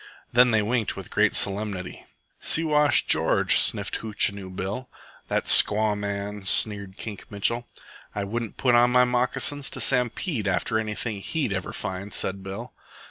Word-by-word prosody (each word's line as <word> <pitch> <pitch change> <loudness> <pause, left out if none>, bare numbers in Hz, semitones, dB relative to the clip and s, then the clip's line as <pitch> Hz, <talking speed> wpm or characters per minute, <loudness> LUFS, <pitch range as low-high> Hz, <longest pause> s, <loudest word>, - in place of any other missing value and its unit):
Then 125 +1 +5
they 110 -2 +2
winked 115 0 -1
with - - -9
great - - +2
solemnity. 100 -2 -3 0.3
"Siwash 150 -2 +2
George," - - +3
sniffed - - 0
Hootchinoo 100 -3 0
Bill. 100 +7 -5 0.4
"That - - -1
squaw 105 0 +4
man," 100 0 -4
sneered 100 0 -1
Kink 105 -3 -8
Mitchell. 115 +4 -1 0.5
"I 100 - -2
wouldn't 115 +2 -4
put 125 -2 +2
on 120 +1 +5
my 125 0 +5
moccasins 125 +3 0
to - - -6
stampede 125 - 0
after 95 +4 0
anything 110 0 -3
he'd 135 -3 -2
ever 95 -1 -4
find," 95 +2 -5
said 95 0 -1
Bill. 95 +1 -7
110 Hz, 145 wpm, -25 LUFS, 100-125 Hz, 0.5 s, Then